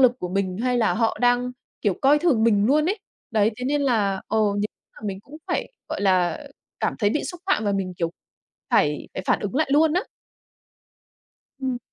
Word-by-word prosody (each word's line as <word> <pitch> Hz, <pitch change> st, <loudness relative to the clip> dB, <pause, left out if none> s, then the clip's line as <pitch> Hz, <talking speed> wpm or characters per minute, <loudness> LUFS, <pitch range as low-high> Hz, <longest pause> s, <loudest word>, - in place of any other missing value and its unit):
lực 255 Hz, -2 st, +7 dB
của 180 Hz, -, -4 dB
mình, 185 Hz, 0 st, -1 dB
hay 250 Hz, -1 st, +1 dB
là 220 Hz, -, +2 dB
họ 225 Hz, -1 st, +1 dB
đang, 245 Hz, 0 st, +2 dB, 0.3 s
kiểu, 205 Hz, -3 st, +1 dB
coi 285 Hz, +2 st, +6 dB
thường 290 Hz, -10 st, +3 dB
mình 210 Hz, -3 st, +4 dB
luôn 300 Hz, +5 st, +3 dB
ấy. 395 Hz, +4 st, 0 dB, 0.3 s
Đấy, 215 Hz, -1 st, +3 dB
thế 250 Hz, -, -5 dB
nên 285 Hz, +2 st, +1 dB
là, 205 Hz, -7 st, +1 dB
ờ, 220 Hz, -, +1 dB, 0.2 s
nếu 205 Hz, +1 st, 0 dB, 0.3 s
mà 215 Hz, -, -8 dB
mình 190 Hz, -1 st, -3 dB
cũng 280 Hz, +7 st, -13 dB
phải, -, -, -2 dB, 0.2 s
gọi -, -, -3 dB
là, 185 Hz, -4 st, +2 dB, 0.4 s
cảm -, -, 0 dB
thấy 205 Hz, -3 st, +2 dB
bị 295 Hz, -, -1 dB
xúc 355 Hz, -2 st, -6 dB
phạm 375 Hz, -, +2 dB
và 205 Hz, -, +1 dB
mình, 190 Hz, -2 st, -2 dB
kiểu, 170 Hz, -1 st, -1 dB, 0.6 s
phải 150 Hz, 0 st, +2 dB
phải 190 Hz, -, -4 dB
phản -, -, +2 dB
ứng 205 Hz, +3 st, -4 dB
lại 310 Hz, 0 st, +2 dB
luôn 310 Hz, +2 st, +5 dB
á. 365 Hz, +3 st, +1 dB, 1.6 s
Ừm. 260 Hz, -2 st, -1 dB
225 Hz, 205 wpm, -24 LUFS, 195-275 Hz, 1.6 s, lực